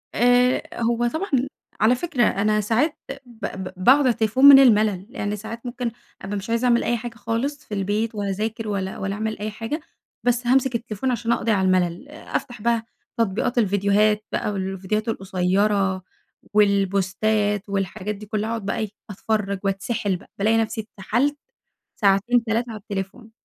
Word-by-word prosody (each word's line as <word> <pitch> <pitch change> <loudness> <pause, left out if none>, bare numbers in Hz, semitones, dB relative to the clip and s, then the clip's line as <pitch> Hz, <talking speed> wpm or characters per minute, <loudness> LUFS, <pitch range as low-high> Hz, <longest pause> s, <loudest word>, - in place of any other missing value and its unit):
آآ 245 +1 +4 0.2
هو 235 +1 +1
طبعًا 320 +11 -3 0.5
على 235 +4 +5
فكرة 265 -3 0
أنا 210 +1 +2
ساعات 240 +9 +1 0.3
ب 235 -2 -8
ب 190 -1 -5
باقعد 265 +6 +7
على 265 -3 +3
التليفون 230 +4 +2
من 280 -1 +11
المَلل؛ 210 -6 +4
لأن 205 -6 -3
ساعات 220 +3 -8
ممكن 240 -1 -3 0.3
أبقى 200 +1 -4
مش 200 +3 -7
عايزة 230 +2 +1
أعمل 235 -1 +3
أي 240 - +1
حاجة 235 0 -7
خالص 235 +6 -3
في 210 - -9
البيت 210 +3 -1
ولا 205 -1 -2
أذاكر 220 +3 -3
ولا 190 -2 -3
ولا 195 0 -3
أعمل 220 0 -3
أي 215 +1 -3
حاجة، 225 +8 -4 0.4
بس 245 0 +1
هامسك 260 0 +3
التليفون 235 +2 -2
عشان 235 0 -1
أقضي 230 -1 +1
على 190 -2 +2
الملل. 185 +7 0
أفتح 245 -6 -5
بقى 230 0 +1 0.3
تطبيقات 230 +3 0
الڤيديوهات 205 +1 +3
بقى، 210 - -1
والڤيديوهات 195 +2 -2
القصيّرة 195 -1 +1 0.5
والبوستات 205 +1 +1
والحاجات 200 +1 -2
دي 210 - -10
كلّها، 215 +1 -2
اقعد 225 -3 -3
بقى 200 - -2
إيه 215 -2 -2 0.2
أتفرّج 200 -1 -2
وأتسحل 195 0 -1
بقى، - - -18
بالاقي 220 +3 +3
نفسي 225 0 -1
اتسحلت 235 +8 -1 0.6
ساعتين، 210 +4 +3
3 230 +2 -1
على 215 - -7
التليفون. 205 +2 -6
215 Hz, 165 wpm, -23 LUFS, 200-235 Hz, 0.6 s, من